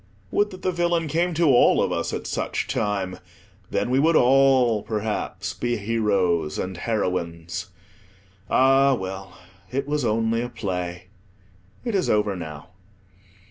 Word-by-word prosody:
Would 205 Hz, 0 st, +2 dB
that 185 Hz, -2 st, -11 dB
the 185 Hz, -, +1 dB
villain 170 Hz, -1 st, 0 dB
came 170 Hz, +3 st, 0 dB
to 165 Hz, 0 st, +3 dB
all 120 Hz, -, +5 dB
of -, -, +1 dB
us -, -, -1 dB
at -, -, -4 dB
such -, -, -2 dB
time; 95 Hz, -3 st, -2 dB, 0.5 s
then 100 Hz, +5 st, -1 dB
we 130 Hz, -, +3 dB
would 160 Hz, +3 st, +3 dB
all, 130 Hz, -4 st, +4 dB
perhaps, 105 Hz, 0 st, -3 dB
be 120 Hz, 0 st, -1 dB
heroes 100 Hz, -7 st, 0 dB
and 95 Hz, 0 st, -3 dB
heroines. 90 Hz, -4 st, -3 dB, 0.8 s
Ah 135 Hz, +1 st, +4 dB
well, 95 Hz, -2 st, -7 dB, 0.3 s
it 135 Hz, +2 st, -2 dB
was 150 Hz, -1 st, -1 dB
only 115 Hz, 0 st, +1 dB
a 120 Hz, -, -3 dB
play: 90 Hz, -5 st, -4 dB, 0.8 s
it 235 Hz, -, -1 dB
is 190 Hz, -3 st, +1 dB
over 105 Hz, -2 st, +2 dB
now. 80 Hz, -1 st, -8 dB
110 Hz, 140 wpm, -24 LUFS, 95-135 Hz, 0.8 s, all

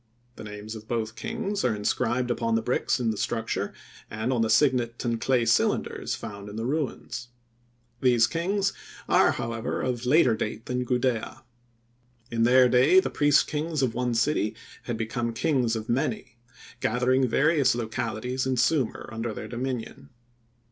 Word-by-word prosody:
The -, -, -9 dB
names 105 Hz, +1 st, -7 dB
of 110 Hz, -1 st, -10 dB
both 110 Hz, -2 st, -2 dB
kings 220 Hz, -3 st, -3 dB
are 120 Hz, -4 st, +2 dB
inscribed 120 Hz, +4 st, 0 dB
upon 115 Hz, -1 st, 0 dB
the 115 Hz, -, 0 dB
bricks 125 Hz, -, 0 dB
in 115 Hz, -2 st, +1 dB
the 110 Hz, -, -5 dB
structure, 115 Hz, +1 st, -2 dB, 0.4 s
and 110 Hz, +5 st, -2 dB
on 120 Hz, -, +1 dB
the 110 Hz, -, +1 dB
signet 120 Hz, -1 st, +2 dB
and 115 Hz, -1 st, -1 dB
clay 125 Hz, -3 st, +2 dB
cylinders 110 Hz, -, +1 dB
found 100 Hz, 0 st, -8 dB
in 100 Hz, -, -9 dB
the 115 Hz, +1 st, -3 dB
ruins. 130 Hz, -3 st, -3 dB, 0.7 s
These 120 Hz, -3 st, +5 dB
kings, 190 Hz, +8 st, 0 dB, 0.3 s
are, -, -, +4 dB
however, 115 Hz, 0 st, -3 dB
of 125 Hz, -1 st, -2 dB
later 130 Hz, -4 st, +5 dB
date 110 Hz, +1 st, -4 dB
than 125 Hz, 0 st, -2 dB
Gudea. 125 Hz, -2 st, -1 dB, 0.9 s
In 115 Hz, -1 st, -1 dB
their 125 Hz, +2 st, +6 dB
day 130 Hz, +9 st, +5 dB
the -, -, -2 dB
priest 145 Hz, 0 st, +4 dB
kings 155 Hz, -1 st, -2 dB
of 120 Hz, -3 st, +1 dB
one 125 Hz, -1 st, -1 dB
city 115 Hz, -3 st, +1 dB, 0.3 s
had 120 Hz, -2 st, -3 dB
become 115 Hz, +1 st, -2 dB
kings 125 Hz, -3 st, +1 dB
of 110 Hz, -1 st, -5 dB
many, 135 Hz, -, -2 dB, 0.4 s
gathering 125 Hz, +3 st, +2 dB
various 145 Hz, +1 st, +3 dB
localities 120 Hz, +2 st, -3 dB
in 130 Hz, -, +1 dB
Sumir 135 Hz, -2 st, +1 dB
under 115 Hz, 0 st, -3 dB
their -, -, -6 dB
dominion. 125 Hz, -1 st, -5 dB
120 Hz, 160 wpm, -26 LUFS, 115-130 Hz, 0.9 s, their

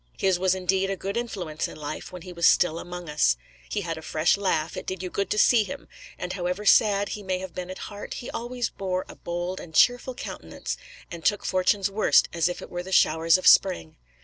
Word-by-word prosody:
His 190 Hz, -2 st, +2 dB
was 190 Hz, 0 st, +2 dB
indeed 190 Hz, +1 st, 0 dB
a 195 Hz, -, -1 dB
good 195 Hz, +2 st, -4 dB
influence 190 Hz, -10 st, -3 dB
in -, -, -10 dB
life 150 Hz, 0 st, -6 dB
while 180 Hz, -2 st, -9 dB
he 180 Hz, -1 st, -9 dB
was 170 Hz, -1 st, +3 dB
still 165 Hz, -2 st, +3 dB
among 175 Hz, 0 st, -7 dB
us; 60 Hz, -, +2 dB, 0.3 s
he 205 Hz, -, -1 dB
had 165 Hz, -3 st, -4 dB
a -, -, -10 dB
fresh 155 Hz, +1 st, +2 dB
laugh, 170 Hz, -5 st, -1 dB
it -, -, -7 dB
did 185 Hz, -1 st, -4 dB
you 180 Hz, -, -5 dB
good 200 Hz, -, -2 dB
to -, -, 0 dB
see 225 Hz, +1 st, +5 dB
him; 200 Hz, -, -8 dB, 0.3 s
and 180 Hz, 0 st, -4 dB
however 180 Hz, +2 st, -3 dB
sad 205 Hz, -1 st, +4 dB
he 210 Hz, -, -5 dB
may 190 Hz, -2 st, -1 dB
have 185 Hz, -1 st, -7 dB
been 180 Hz, 0 st, -6 dB
at 185 Hz, -, -6 dB
heart, 205 Hz, 0 st, -7 dB
he 245 Hz, -, -6 dB
always 240 Hz, 0 st, -3 dB
bore 185 Hz, -1 st, -3 dB
a -, -, -11 dB
bold 175 Hz, +2 st, -4 dB
and 160 Hz, -2 st, -11 dB
cheerful 245 Hz, +1 st, +4 dB
countenance, -, -, -6 dB, 0.4 s
and 170 Hz, -1 st, -7 dB
took 205 Hz, +4 st, +1 dB
fortune's 190 Hz, +1 st, +1 dB
worst 210 Hz, +2 st, +4 dB
as 170 Hz, 0 st, +2 dB
it 180 Hz, -, -6 dB
were 175 Hz, -, -3 dB
the 185 Hz, +2 st, -9 dB
showers 165 Hz, -1 st, +4 dB
of 185 Hz, -, -7 dB
spring. 80 Hz, -, +5 dB
185 Hz, 230 wpm, -26 LUFS, 170-200 Hz, 0.4 s, see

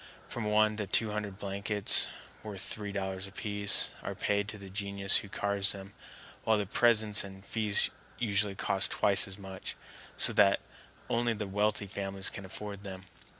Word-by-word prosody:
From 120 Hz, -, -4 dB
one 105 Hz, 0 st, +3 dB
to 105 Hz, -2 st, -3 dB
two 110 Hz, +2 st, +3 dB
hundred 105 Hz, -2 st, -4 dB
blankets, 100 Hz, +1 st, +3 dB, 0.3 s
worth 100 Hz, -4 st, -5 dB
three 105 Hz, +1 st, -4 dB
dollars 95 Hz, -1 st, -4 dB
apiece, 100 Hz, +1 st, +1 dB
are -, -, -5 dB
paid 100 Hz, 0 st, 0 dB
to 105 Hz, -, -5 dB
the 100 Hz, -1 st, -10 dB
genius 100 Hz, 0 st, +1 dB
who 100 Hz, -, -4 dB
carves 100 Hz, 0 st, +1 dB
them, 100 Hz, 0 st, -10 dB, 0.5 s
while 110 Hz, -1 st, +3 dB
the 105 Hz, -, -1 dB
presents 110 Hz, 0 st, +3 dB
and 95 Hz, 0 st, -11 dB
feast 105 Hz, -2 st, +1 dB, 0.3 s
usually 105 Hz, -3 st, 0 dB
cost 95 Hz, 0 st, +2 dB
twice 100 Hz, +1 st, +5 dB
as 95 Hz, 0 st, -6 dB
much, 95 Hz, -1 st, -6 dB, 0.4 s
so -, -, +4 dB
that 100 Hz, -1 st, +5 dB, 0.5 s
only 120 Hz, 0 st, +1 dB
the 105 Hz, -1 st, -4 dB
wealthy 105 Hz, +1 st, 0 dB
families 95 Hz, -1 st, -1 dB
can 95 Hz, -, -7 dB
afford 100 Hz, +1 st, -7 dB
them. 95 Hz, -2 st, -7 dB
100 Hz, 165 wpm, -31 LUFS, 95-105 Hz, 0.5 s, twice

